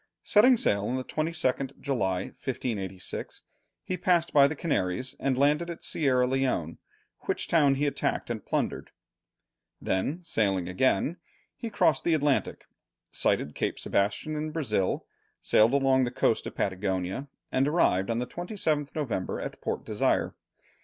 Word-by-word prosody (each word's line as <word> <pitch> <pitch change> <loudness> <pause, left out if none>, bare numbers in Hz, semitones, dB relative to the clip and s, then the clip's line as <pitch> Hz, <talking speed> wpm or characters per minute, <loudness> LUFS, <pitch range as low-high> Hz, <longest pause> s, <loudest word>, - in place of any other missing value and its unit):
Setting 245 +4 +6
sail 100 - +1
on 125 - -1
the 130 - -2
22nd 140 -4 -1
July, 95 -10 0
1586, 100 -8 -5 0.4
he 185 - -3
passed 175 -2 +2
by 140 -1 +7
the 155 - -4
Canaries, 130 - -1
and 135 -2 0
landed 150 +5 +2
at 170 - -7
Sierra 130 -5 +2
Leone, 125 -11 -1 0.5
which - - -1
town 145 -5 +4
he 145 +2 0
attacked 145 - -1
and - - -4
plundered; - - -2 0.9
then, 140 - -1
sailing 100 - 0
again, 130 - +1 0.4
he 230 - -5
crossed 205 - +2
the 170 - +3
Atlantic, 145 -2 0 0.5
sighted 75 - +1
Cape - - -2
Sebastian 100 +10 -1
in 155 +1 -2
Brazil, 125 - -1 0.3
sailed 115 +5 +4
along 135 -1 +3
the - - -1
coast 115 -2 +1
of - - -8
Patagonia, 95 +5 -2 0.2
and 135 +2 +2
arrived 95 - +2
on 115 - 0
the 125 - -1
27th 155 - -2
November 130 -12 -2
at - - -6
Port - - -3
Desire. - - +1
135 Hz, 145 wpm, -28 LUFS, 100-155 Hz, 0.9 s, by